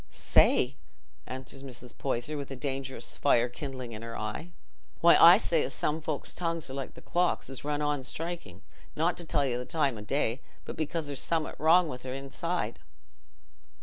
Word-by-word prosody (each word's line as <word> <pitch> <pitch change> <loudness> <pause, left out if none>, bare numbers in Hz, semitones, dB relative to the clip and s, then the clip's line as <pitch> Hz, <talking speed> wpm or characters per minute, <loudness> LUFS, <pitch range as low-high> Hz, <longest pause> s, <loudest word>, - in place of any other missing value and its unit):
"Say!" - - +3 0.5
answered 130 +1 -7
Mrs. 125 -2 -9
Poyser, 135 +2 -2
with 140 -2 -6
dangerous 135 -3 -3
fire 120 0 +4
kindling 130 -1 -6
in 110 -1 -7
her 115 0 -6
eye. 105 -4 -4 0.5
"Why, - - +7
I - - +10
say - - +1
as - - -2
some 155 +2 -1
folks' 155 -2 -3
tongues 165 -5 -2
are - - -6
like 135 -1 -5
the - - -13
clocks 175 -5 0
as 135 - -7
run 150 0 -1
on 145 -2 0
strikin', 160 - -5 0.3
not 165 +3 +2
to 175 - -4
tell 150 -3 +1
you 125 -2 0
the - - -3
time 140 -8 0
o' - - -7
the 105 - -12
day, 135 -2 +1 0.2
but - - -6
because 160 +1 -2
there's 140 -2 -3
summat 165 -2 0
wrong 165 +1 +5
i' 125 - -5
their 130 +1 -6
own 135 - -5
inside..." 135 -2 -2
135 Hz, 190 wpm, -29 LUFS, 125-155 Hz, 0.5 s, I